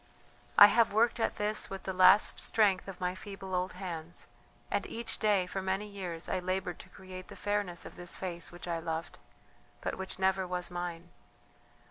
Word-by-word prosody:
"I - - +13
have 225 +1 +4
worked 230 +3 +3
at - - +1
this 210 +1 0
with 195 -1 -6
the 190 - -3
last 185 +3 +6
strength 200 -4 +2
of 195 -2 -8
my 180 0 0
feeble 195 0 -8
old 180 +1 0
hands. 175 -3 -5 0.5
And - - 0
each 230 0 -3
day 205 -4 +3
for 190 +1 -4
many 190 +2 -1
years 185 -5 -5
I - - 0
laboured 185 -1 -2
to - - -12
create 185 -1 -10
the - - -10
fairness 205 -3 -1
of - - -10
this 175 -1 -3
face 175 -3 -5
which 175 0 -9
I 170 -1 -1
loved, 160 0 -4 0.6
but - - -4
which 190 0 -4
never 190 0 +1
was 180 0 -3
mine! 175 -1 -5
185 Hz, 185 wpm, -32 LUFS, 175-200 Hz, 0.6 s, I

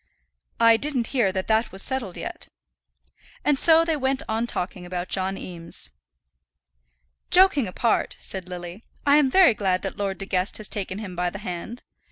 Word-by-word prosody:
"I 230 0 +6
didn't 270 -3 0
hear 235 -8 +2
that 185 0 -2
that 220 +1 +1
was 190 +1 +2
settled 255 -9 -1
yet." - - -7 1.0
And 290 -2 +3
so 330 0 +6
they 325 -1 +1
went 265 -1 0
on 225 +2 -1
talking 180 -3 -4
about 180 0 -5
John 190 0 -1
Eames. 165 - -7 1.4
"Joking 360 - +5
apart," 225 +5 0
said 185 -2 -6
Lily, 175 +3 -8 0.2
"I 285 +1 +6
am 290 -3 +4
very 365 -2 +6
glad 190 -3 -1
that 195 - -4
Lord 195 -2 -2
De 195 - -6
Guest 185 0 -1
has 215 - -5
taken 195 -2 -4
him 200 -4 -7
by 180 0 0
the 185 - -8
hand. 200 +4 -6
205 Hz, 175 wpm, -24 LUFS, 185-260 Hz, 1.4 s, I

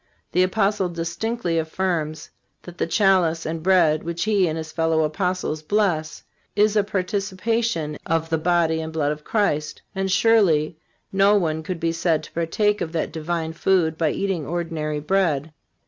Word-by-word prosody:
The 180 - +2
Apostle 195 0 +1
distinctly 170 +2 -2
affirms 160 -2 -2 0.3
that 175 -1 -11
the - - 0
chalice 180 -4 +2
and 160 +1 -3
bread 165 -4 +4
which 170 0 -3
he 205 -4 +2
and 160 0 -2
his 160 -1 -6
fellow 160 -1 +1
Apostles 180 0 -1
bless 160 -3 0 0.3
is 210 +1 +3
a 210 - +4
participation 195 -3 -1
of 165 0 0
the 160 - +2
body 165 -1 +2
and 160 0 -5
blood 150 -2 0
of 150 0 -6
Christ. 155 -9 -1
And 190 -1 -1
surely 185 -8 +3 0.4
no 195 +2 +5
one 160 -5 0
could 170 +2 -5
be 165 0 0
said 165 -2 0
to - - -11
partake 205 +6 0
of 160 - -3
that 165 - -1
divine 160 0 -3
food 165 -1 +2
by 160 -1 +1
eating 190 -3 -1
ordinary 160 -1 -3
bread. 155 -3 0
170 Hz, 165 wpm, -23 LUFS, 160-195 Hz, 0.4 s, no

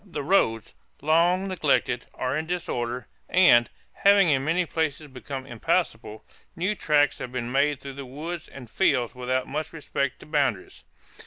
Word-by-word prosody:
The 170 -8 -6
roads, 115 - +1 0.3
long 175 +5 +3
neglected, 140 -8 0
are 130 +1 -2
in 160 +1 -2
disorder 125 -8 -3 0.2
and, 120 -11 +5 0.2
having 200 -3 +5
in 135 -2 +2
many 170 +4 +1
places 155 -2 -2
become 135 -1 -7
impassable, 110 -3 -2 0.3
new 185 +4 0
tracks 150 -7 +2
have 125 - -6
been 125 -1 -4
made 140 +1 +2
through 140 -1 -8
the 140 0 -8
woods 155 +5 -6
and 130 -3 -11
fields 120 0 +1
without 130 +1 -2
much 155 +3 -4
respect 140 -3 -3
to - - -11
boundaries." 145 - -1
140 Hz, 155 wpm, -25 LUFS, 125-165 Hz, 0.3 s, and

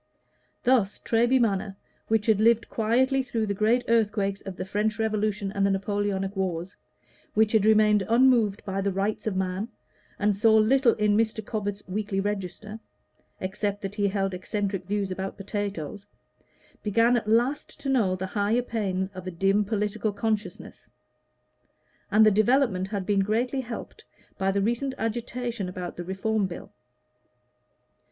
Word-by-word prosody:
Thus 240 -6 +2
Treby 240 +3 +2
Magna, 200 -3 0 0.3
which 220 -1 +1
had 215 -2 +3
lived 230 0 +3
quietly 255 +5 +2
through 235 -4 -2
the 200 - -1
great 220 +5 +2
earthquakes 205 -3 +1
of 195 -2 -7
the 185 - -5
French 210 +3 -1
Revolution 215 -2 -1
and 200 0 -1
the 200 - +3
Napoleonic 195 0 -1
wars, 185 -1 -3 0.6
which 215 0 +4
had 220 -2 +3
remained 215 -1 +5
unmoved 230 -4 +3
by 195 -1 -2
the 200 0 0
"Rights 200 +3 -2
of 205 - -1
Man," 190 +2 -2 0.5
and 205 0 +1
saw 220 +2 +4
little 235 +3 +4
in 210 -1 +2
Mr. 220 -1 0
Cobbett's 205 -2 -4
"Weekly 200 +1 -2
Register" 205 +2 -4 0.6
except 205 +2 -3
that 195 0 -4
he 205 -1 +1
held 195 -1 -1
eccentric 195 0 -3
views 200 -1 -1
about 190 +1 -4
potatoes, 200 -2 -5 0.7
began 230 +3 +3
at 225 -3 -1
last 240 +8 0
to 280 - -5
know 225 -9 +2
the 185 0 -4
higher 210 +4 0
pains 195 -6 -2
of 185 0 -8
a - - -1
dim 195 +4 +2
political 210 0 -1
consciousness; 215 +1 -4 1.2
and 215 +1 +5
the 215 - +6
development 215 -2 +2
had 195 -2 -3
been 200 0 +2
greatly 235 +7 0
helped 240 -2 -8 0.3
by 195 0 +2
the 200 0 0
recent 240 +5 -1
agitation 235 -2 -3
about 180 -1 -6
the 175 - -5
Reform 195 +3 -1
Bill. 175 - -9
210 Hz, 155 wpm, -26 LUFS, 195-225 Hz, 1.2 s, the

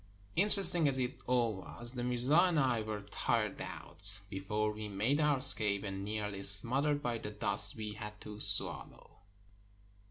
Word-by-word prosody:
Interesting 180 -4 +4
as 135 -2 +2
it 125 -1 -4
all 120 -3 0
was, 120 +5 -7
the 125 -1 -6
mirza 125 +4 +1
and 175 -2 +3
I 125 -5 0
were 105 -1 -6
tired 105 - -3
out 95 +3 -4
before 105 +3 -3
we 105 0 -8
made 110 +9 -1
our 150 -2 +1
escape, 110 -7 +6
and 95 -1 -6
nearly 105 -1 -5
smothered 130 +9 +1
by 120 -3 -3
the 105 - -7
dust 105 0 +1
we 110 -1 -7
had 105 0 -10
to 105 -1 -10
swallow. 100 -7 0
110 Hz, 160 wpm, -32 LUFS, 105-130 Hz, -, escape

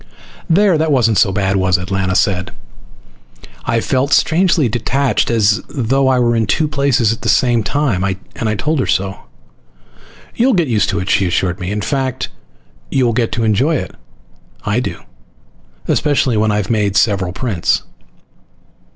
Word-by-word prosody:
"There. 185 -1 +3
That 160 0 +1
wasn't 115 -6 +3
so 95 - +3
bad, 95 0 0
was 95 -1 +2
it?" 90 +2 -7
Lana 95 -1 0
said. 90 -1 +1 1.2
I 115 - +1
felt 135 +4 0
strangely 165 -4 +3
detached, 130 +4 0
as 105 -3 +2
though 135 +1 0
I 130 -1 +3
were 120 -1 +2
in 115 -1 0
two 155 - +1
places 140 -6 +1
at 115 - -10
the - - -2
same 120 -2 +3
time. 120 -5 -1
I 100 -1 0 0.4
told 155 +6 -1
her - - 0
so. 95 0 -1 1.2
"You'll 245 0 +2
get 170 -4 +1
used 110 -5 +1
to 100 - -1
it," 90 - -6
she 100 -2 +2
assured 90 +1 -1
me. 90 - -4
"In 105 +1 -2
fact, 130 +1 -2 0.6
you 130 -2 +1
will 120 - +1
get 115 0 0
to 115 - -1
enjoy 115 +9 +2
it. 95 - -4 0.7
I 105 +4 +1
do. 125 - -5 0.9
Especially 140 -5 +1
when 110 0 +1
I've 105 -1 -1
made 105 -3 0
several 95 -5 +1
prints." 95 -3 -1
115 Hz, 165 wpm, -16 LUFS, 100-135 Hz, 1.2 s, There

